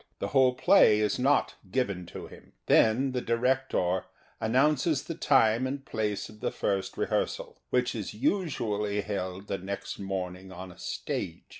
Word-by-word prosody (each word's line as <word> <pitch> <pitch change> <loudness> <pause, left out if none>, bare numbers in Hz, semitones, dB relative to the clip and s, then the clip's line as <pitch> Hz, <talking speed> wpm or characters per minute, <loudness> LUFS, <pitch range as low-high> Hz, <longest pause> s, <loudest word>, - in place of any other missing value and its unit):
The - - -3
whole 130 -2 +4
play 105 -3 +5
is 105 +1 0
not 140 +3 +2 0.2
given 100 -9 -1
to - - -8
him. - - -15
Then 125 +5 +4
the 125 -1 -2
director 115 -7 0 0.3
announces 135 +5 +2
the 165 - -5
time 130 -5 +3
and 135 +1 -5
place 105 -4 -2
of 105 - -15
the - - -1
first 95 -1 -2
rehearsal, - - -2
which 125 0 +1
is 110 -5 -4
usually 105 - -1
held 95 -1 -4
the 100 - -3
next 100 +2 -5
morning 95 -1 -5
on 95 0 -8
a - - -17
stage. - - -4
110 Hz, 155 wpm, -28 LUFS, 100-130 Hz, 0.3 s, play